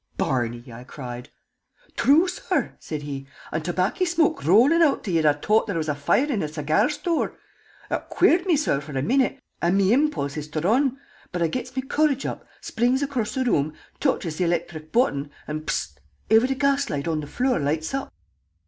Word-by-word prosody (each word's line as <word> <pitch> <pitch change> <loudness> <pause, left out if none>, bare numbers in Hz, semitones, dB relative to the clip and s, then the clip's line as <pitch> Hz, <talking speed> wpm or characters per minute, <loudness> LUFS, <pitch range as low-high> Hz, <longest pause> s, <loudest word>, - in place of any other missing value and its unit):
"Barney!" 120 -1 -2
I 120 +2 -9
cried. 125 -2 -8 0.7
"Thrue, 315 +7 +4
sorr," - - -2
said 150 -2 -6
he. 135 -2 -6 0.2
"And 155 0 -2
tobacky 180 - 0
shmoke 335 - +1
rollin' 240 - +5
out 295 -4 +3
till 190 - -3
you'd 160 -2 +2
'a' 150 -1 +5
t'ought 215 +9 +2
there 200 -5 -2
was 160 -1 -2
a 150 - +1
foire 145 - +2
in 265 -9 -1
a 155 - -1
segyar 155 - +1
store! 325 +2 -1 0.5
Ut - - -3
queered 355 0 +3
me, 335 -5 +4
sorr, 210 - +1
for 145 -2 -6
a 130 - 0
minute, 265 - +1 0.2
and 175 +3 +2
me 200 +2 +4
impulse 260 - 0
is 150 0 -4
to 155 +1 -3
run; 255 - +2 0.3
but 175 -1 -1
I - - +3
gets 250 +5 -5
me 260 - -1
courage 285 0 +1
up, - - -5
springs 250 +4 +1
across 260 -6 -2
the 260 -1 0
room, 155 - +1 0.2
touches 175 - 0
the 180 - +2
electhric 170 -2 -2
button, 145 - +1 0.2
an' 155 +1 -4
bzt! - - -2 0.3
every 250 +5 +5
gas 280 +1 +1
jet 145 +2 -3
on 160 -2 0
the 150 - -6
flure 250 - 0
loights 155 - -1
up!" 275 - -3
185 Hz, 195 wpm, -24 LUFS, -, 0.7 s, rollin